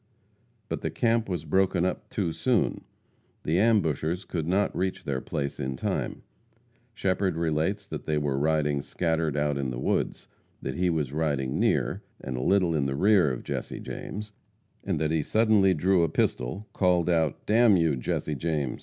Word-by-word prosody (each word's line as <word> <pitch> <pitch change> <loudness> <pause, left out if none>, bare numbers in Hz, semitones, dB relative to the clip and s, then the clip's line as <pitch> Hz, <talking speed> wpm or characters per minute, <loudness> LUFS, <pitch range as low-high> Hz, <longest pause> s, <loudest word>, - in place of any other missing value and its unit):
But - - -4
the - - -1
camp 115 -3 +1
was 90 - -3
broken 95 -2 +2
up 90 - -3
too 90 -6 -1
soon. 120 +5 0 0.6
The 80 +4 +1
ambushers 90 -6 +1
could 80 -3 -3
not 100 +3 +1
reach 95 0 -2
their 65 -2 -2
place 70 -1 -3
in 65 0 -2
time. - - -3 0.7
Shepherd 95 -1 0
relates 85 +5 0
that - - -7
they 75 -1 +1
were 70 -2 0
riding 75 -1 +1
scattered 80 -2 -1
out 75 -1 0
in 70 -2 -1
the 60 - -4
woods; 65 - -1 0.3
that - - -4
he 90 0 +1
was 75 -5 -1
riding 70 -4 -1
near, - - +1 0.2
and 65 - -5
a 60 - -3
little 90 +2 +3
in 70 -3 +1
the 70 - -2
rear 95 -2 +4
of 60 - -5
Jesse - - -4
James; 105 +1 -6 0.5
that 75 +1 0
he 80 -1 +2
suddenly 105 +1 +3
drew 90 +3 +3
a 85 - +2
pistol, 75 - -1
called 90 -3 +2
out, 80 -4 +1
"Damn 110 -2 +5
you, 80 -4 +2
Jesse 65 +4 -2
James! 75 -3 -2
80 Hz, 170 wpm, -27 LUFS, 75-95 Hz, 0.7 s, Damn